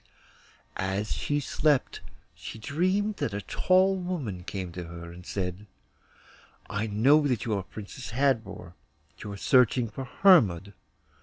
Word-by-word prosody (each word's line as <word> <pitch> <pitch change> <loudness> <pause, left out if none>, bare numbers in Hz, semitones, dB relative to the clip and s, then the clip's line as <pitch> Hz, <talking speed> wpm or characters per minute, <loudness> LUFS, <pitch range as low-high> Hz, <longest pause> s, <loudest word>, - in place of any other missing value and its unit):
As 95 +2 -2
she 145 0 -1
slept 145 -1 0 0.3
she - - -9
dreamed 185 - 0
that 100 - -2
a 100 - -3
tall 185 - +3
woman 160 - -4
came 95 -1 -5
to 90 0 -7
her 85 0 -9
and 90 +1 -12
said, 95 +1 -4 1.0
'I 105 +2 -1
know 135 +9 +4
that 125 -7 -1
you 115 - -1
are 100 - 0
Princess 105 +6 -9
Hadvor, 110 -8 -1 0.5
and 105 - -6
are 100 - -6
searching 125 +1 +3
for 135 +5 -6
Hermod. 105 - +4
110 Hz, 140 wpm, -27 LUFS, 95-145 Hz, 1.0 s, know